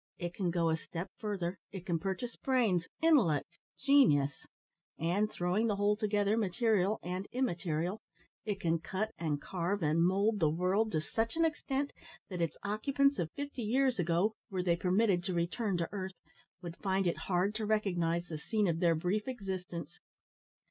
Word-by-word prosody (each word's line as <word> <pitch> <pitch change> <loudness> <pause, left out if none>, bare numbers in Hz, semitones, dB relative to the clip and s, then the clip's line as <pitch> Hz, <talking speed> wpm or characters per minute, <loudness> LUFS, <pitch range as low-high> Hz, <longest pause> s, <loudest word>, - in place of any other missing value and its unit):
It 175 -1 -4
can 185 -2 -1
go 170 -1 +1
a 160 - +1
step 165 +2 -6
further 190 -4 -3
it 190 -2 -7
can 170 -2 0
purchase 195 +7 -3
brains, 225 -11 +1 0.2
intellect, 240 - +4 0.3
genius; 145 - +3 0.5
and, 185 +6 +1
throwing 180 +6 +1
the 210 - +1
whole 205 +1 +2
together, 210 -1 +1
material 210 0 +2
and 180 +3 -3
immaterial, 180 -6 -1 0.4
it 205 -3 -2
can 165 -2 +1
cut, 205 +6 -3
and 150 -3 -1
carve, 185 +3 -2
and 155 +2 +2
mould 200 +4 +2
the 160 -4 +4
world 185 +7 +1
to 155 - +1
such 225 - -2
an 330 0 +3
extent 285 -3 -1 0.4
that 180 -2 -3
its 165 -3 -1
occupants 275 +7 +1
of 165 - -1
fifty 285 -2 -5
years 250 +1 +2
ago, 175 +5 +2 0.2
were 185 -3 -2
they 175 -2 +3
permitted 185 +1 +2
to 185 -2 -1
return 180 +4 0
to 170 -1 -1
earth, 190 -2 -4 0.5
would 170 -1 -6
find 190 -1 0
it 170 - +1
hard 185 +3 +2
to 215 0 -2
recognise 175 -6 +1
the 155 -2 -5
scene 210 +5 0
of 165 -1 0
their 170 -2 +4
brief 185 +7 -1
existence. 185 - -5
190 Hz, 170 wpm, -33 LUFS, 170-215 Hz, 0.5 s, intellect